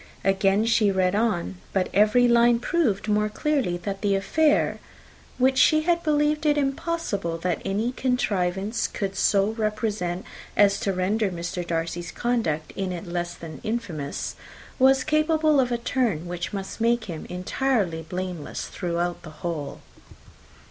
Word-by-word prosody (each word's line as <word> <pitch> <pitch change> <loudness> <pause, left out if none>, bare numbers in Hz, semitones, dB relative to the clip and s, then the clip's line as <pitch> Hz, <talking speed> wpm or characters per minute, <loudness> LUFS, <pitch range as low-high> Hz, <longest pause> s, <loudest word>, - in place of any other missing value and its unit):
Again 195 +2 +3
she 230 -2 +3
read 185 -1 +1
on. 205 - 0 0.2
But 190 -2 +1
every 215 +4 +5
line 235 0 +5
proved 235 - 0
more 210 0 +2
clearly 260 -6 0
that 195 0 -4
the 200 -2 +2
affair, 295 +10 +2 0.6
which 260 +1 +3
she 310 -1 +5
had 340 +1 +1
believed 300 -1 +1
it 295 0 +3
impossible 270 - -1
that 175 0 -2
any 210 +5 -1
contrivance 205 -5 0
could 195 -2 -4
so 200 +1 +3
represent 215 -5 -2 0.3
as 200 -1 +5
to 195 - 0
render 195 +3 0
Mr. 175 0 -4
Darcy's 170 +1 -3
conduct 225 -11 -1
in 190 -1 -2
it 175 +1 -5
less 175 0 -3
than 155 -4 -9
infamous, 170 -11 -3 0.4
was 265 0 +5
capable 310 0 +3
of 250 -2 +2
a 240 - +1
turn 235 - -1
which 175 0 -4
must 195 +2 -6
make 235 0 +2
him 165 -5 -7
entirely 185 -2 -1
blameless 180 -1 -5
throughout 175 -1 -2
the 165 - -10 0.2
whole. 160 -4 -4
205 Hz, 145 wpm, -25 LUFS, 180-245 Hz, 0.6 s, every